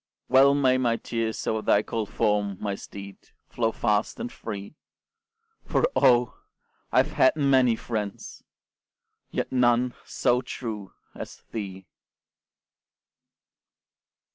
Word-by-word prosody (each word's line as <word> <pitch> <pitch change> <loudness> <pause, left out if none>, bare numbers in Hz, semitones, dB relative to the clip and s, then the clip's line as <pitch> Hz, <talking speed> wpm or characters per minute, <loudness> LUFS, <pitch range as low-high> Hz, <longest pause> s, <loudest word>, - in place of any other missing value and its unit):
Well 135 +2 +6
may 130 -2 +3
my 120 -2 +2
tears 115 -2 -3
o'er 110 0 0
thy 105 0 +3
cold 110 -2 -3
form, 105 -3 0
My 100 -1 -2
steed, 100 0 -9 0.3
flow 115 -2 0
fast 105 - 0
and 240 +1 -4
free, 100 +3 -7 0.9
For, - - +1
oh! 120 -1 +3 0.5
I - - +1
have - - -9
had 130 - +4
many 130 -5 +4
friends, 105 -4 -5 0.9
Yet - - -3
none 125 -1 +3
so 125 -1 +1
true 110 -5 -6 0.2
as - - -9
thee! 95 -4 -6
115 Hz, 115 wpm, -26 LUFS, 105-125 Hz, 0.9 s, Well